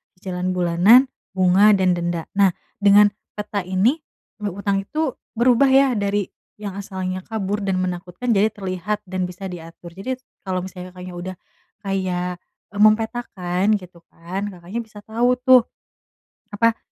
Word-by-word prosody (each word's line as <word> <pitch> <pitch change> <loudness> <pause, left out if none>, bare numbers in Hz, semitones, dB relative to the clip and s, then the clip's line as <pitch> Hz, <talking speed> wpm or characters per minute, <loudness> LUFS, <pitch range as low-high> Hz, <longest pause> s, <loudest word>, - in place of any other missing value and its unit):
cicilan 185 0 -3
bulanan, 180 +9 +5 0.3
bunga 190 +3 +5
dan 185 -2 +3
denda. 170 -1 -2
Nah, 195 -3 +5 0.3
dengan 205 0 +6 0.3
peta 205 -2 -3
ini, 200 - +2 0.4
eee, 210 -1 -2
hutang 200 0 0
itu 310 +3 -1 0.2
berubah 245 +3 +4
ya 270 0 +5
dari 200 -1 0 0.3
yang 200 -2 -5
asalnya 185 -2 -4
kabur 205 -2 -2
dan 190 -1 0
menakutkan 180 +5 -4
jadi 215 0 +3
terlihat 195 +1 -3
dan 185 0 -1
bisa 180 +2 -7
diatur. 170 0 -10
Jadi 255 +7 -3 0.3
kalau 185 -1 -1
misalnya 185 -1 -9
Kakaknya 180 -1 -9
udah 185 +2 -5 0.5
kayak 185 -3 -2 0.4
mempetakan 215 -3 +2
gitu 180 -1 -14
kan, 190 +4 -5
Kakaknya 180 +5 -6
bisa 215 -1 -13
tahu 235 +4 +1
tuh. 255 -2 +6 0.9
Apa 230 +2 +2
195 Hz, 140 wpm, -22 LUFS, 180-215 Hz, 0.9 s, dengan